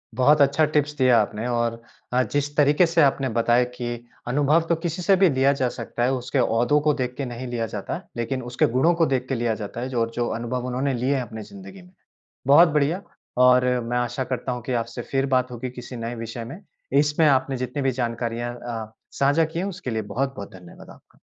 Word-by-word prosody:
बहुत 145 +3 +4
अच्छा 140 +3 +4
टिप्स 150 0 +1
दिया 130 -3 +5
आपने 105 +3 -3
और 120 -1 -1 0.3
अ, 125 - +4
जिस 145 +1 -2
तरीके 150 +4 +5
से 165 0 +2
आपने 135 -2 +2
बताया 120 +1 +4
कि 120 -1 -5 0.2
अनुभव 145 +5 +3
तो 170 - +4
किसी 170 +2 -2
से 195 +2 +4
भी 190 -1 +4
लिया 135 0 +3
जा 130 -3 0
सकता 120 - -4
है। 125 - +2
उसके 130 +1 -2
ओहदों 120 +5 +2
को 150 -1 +2
देख 125 -3 -3
के 140 - -2
नहीं 125 +1 -6
लिया 120 -2 -2
जाता, - - -5 0.2
लेकिन 130 +3 -2
उसके 120 - +2
गुणों 165 +7 +4
को 165 -1 +3
देख 130 -3 -1
के 135 - 0
लिया 115 -1 0
जाता 110 +3 -6
है 130 - -3
जो 125 -3 -2
और 115 0 -1
जो 120 -1 0
अनुभव 120 +2 -3
उन्होंने 130 +2 -1
लिए 125 +4 0
हैं 130 - 0
अपनी 110 -1 -8
ज़िन्दगी 195 -1 -12
में। 180 0 -18 0.6
बहुत 160 +5 +8
बढ़िया, 150 +5 +1 0.4
और 125 0 +5 0.2
मैं 120 +1 -2
आशा 120 +2 -1
करता 130 0 -3
हूँ 125 -1 -4
कि 130 - -3
आपसे 115 +1 -7
फिर 135 0 +1
बात 125 0 +1
होगी 125 +1 -5
किसी 125 0 -9
नए 115 +1 -4
विषय 115 0 -6
में। 140 +10 -9 0.4
इसमें 150 +2 +2
आपने 135 -1 +2
जितनी 125 +3 -3
भी 135 - +2
जानकारियाँ 120 0 -3
अ, 115 -2 -6 0.2
साझा 145 +4 +3
की 160 +2 -5
हैं, 185 - -1
उसके 185 -7 -5
लिए 110 - -1
बहुत 135 +1 -1
बहुत 100 -1 -8
धन्यवाद 90 -2 -13
आपका। - - -18
130 Hz, 225 wpm, -24 LUFS, 120-145 Hz, 0.6 s, बहुत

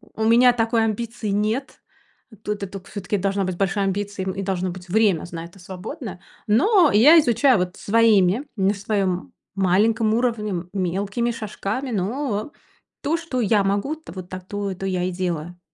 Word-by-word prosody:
у 220 - -2
меня 240 +2 +6
такой 225 -1 +1
амбиции 225 0 -3
нет. 215 +7 -1 0.6
Тут 210 -1 -3
эту 195 0 -6
все-таки 205 0 -3
должна 195 +1 0
быть 185 -1 -3
большая 195 +1 0
амбиции, 200 0 -2
и 195 - -3
должно 185 -1 -1
быть 180 +1 -10
время 205 -4 +2
с 175 - -12
на 165 -1 -6
это 175 +3 -15
свободное. 190 - -8 0.3
Но 335 - +4
я 295 +11 +8
изучаю 260 -1 +4
вот 180 0 -2
своими, 215 0 +3
на 195 +1 +2
своем 195 -3 -2 0.2
маленьком 215 +4 +2
уровне, 215 -6 -1
мелкими 195 +5 -1
шажками 225 +4 -4
но 215 +4 -2 0.5
то, 310 - 0
что 330 -7 -4
я 210 -2 +3
могу, 200 +10 0
вот 185 -1 -8
та 185 - -5
то, 200 +1 -4
то 190 - -6
я 185 -2 -1
и 185 - -1
делаю. 175 -1 -4
205 Hz, 165 wpm, -22 LUFS, 185-230 Hz, 0.6 s, я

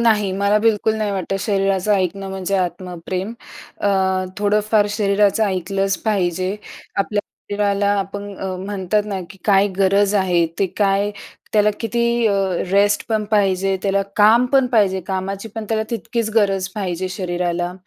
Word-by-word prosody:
नाही, 215 -4 +3
मला 200 +1 +3
बिलकुल 220 0 +2
नाही 215 -1 -1
वाटतं 195 0 -2
शरीराचं 195 -1 +1
ऐकणं 195 +1 -1
म्हणजे 190 +1 -2
आत्मप्रेम. 180 +2 -3 0.5
अ, 205 - +1 0.5
थोडंफार 210 +1 +2
शरीराचं 205 +1 +2
ऐकलंच 195 +1 -1
पाहिजे. 185 -2 0 0.4
आपल्या 205 +1 0 0.3
शरीराला 200 0 +1
आपण 195 +1 -4 0.4
म्हणतात 205 +1 -1
ना, 195 -2 -3
की 195 - -13
काय 200 -1 +4
गरज 200 +1 +3
आहे 180 -4 +2
ते 195 - +2
काय 200 0 +2 0.4
त्याला 210 0 +4
किती 235 +1 -1 0.2
अ, 210 - +3 0.4
रेस्ट 205 +1 +2
पण 215 -1 0
पाहिजे. 195 -2 +2
त्याला 195 0 +1
काम 225 +4 +5
पण 270 -2 +5
पाहिजे. 195 -4 +3
कामाची 195 +3 -3
पण 225 - -4
त्याला 220 -1 +1
तितकीच 230 0 -2
गरज 195 -3 +2
पाहिजे 185 -2 -3
शरीराला. 175 -1 -2
200 Hz, 140 wpm, -20 LUFS, 190-210 Hz, 0.5 s, काम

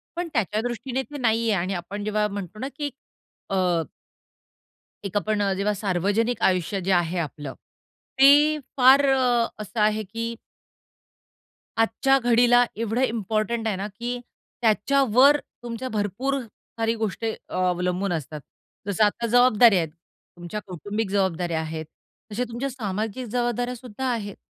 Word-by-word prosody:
पण 350 0 -2
त्याच्या 215 -2 0
दृष्टीने 245 +2 -3
ते 295 - -7
नाही 230 -3 +2
आहे. 195 -5 +2
आणि 190 +2 -2
आपण 190 +4 -5
जेव्हा 210 0 +1
म्हणतो 200 0 -7
ना 265 - -3
की 290 0 -3 0.6
अ, 180 -3 +1 1.2
एक 200 0 -5
आपण 210 0 0
अ, 195 -1 +1
जेव्हा 200 +2 +1
सार्वजनिक 205 +4 0
आयुष्य 185 +1 -1
जे 190 +2 -2
आहे 175 0 +1
आपलं, 145 -4 -5 0.6
ते 275 +1 +9 0.4
फार 265 +2 +7 0.6
असं 210 +2 -4
आहे 215 +1 +2
की 230 +4 -4 1.5
आजच्या 265 +4 +3
घडीला 245 0 +5
एवढं 230 +3 -1
इम्पॉर्टंट 225 0 -1
आहे 210 -4 0
ना 195 +2 -3
की 245 +1 -3 0.4
त्याच्यावर 260 +4 +4 0.3
तुमच्या 240 +2 -5
भरपूर 220 +6 -1
साऱ्या 225 0 -4
गोष्टी 220 +1 -2 0.2
अवलंबून 180 +1 0
असतात. 155 -1 -4 0.5
जसं 205 +2 +2
आता 235 +3 0
जबाबदाऱ्या 235 -3 +6
आहेत, 165 - -2 0.5
तुमच्या 175 +5 -6
कौटुंबिक 205 +4 -4
जबाबदाऱ्या 175 -4 0
आहेत. 160 0 -5 0.5
तशा 245 +4 -1
तुमच्या 250 +4 -3
सामाजिक 220 +1 -4
जबाबदाऱ्या 245 +1 -1
सुद्धा 250 +1 -6
आहेत. 205 -4 -4
215 Hz, 135 wpm, -24 LUFS, 190-240 Hz, 1.5 s, ते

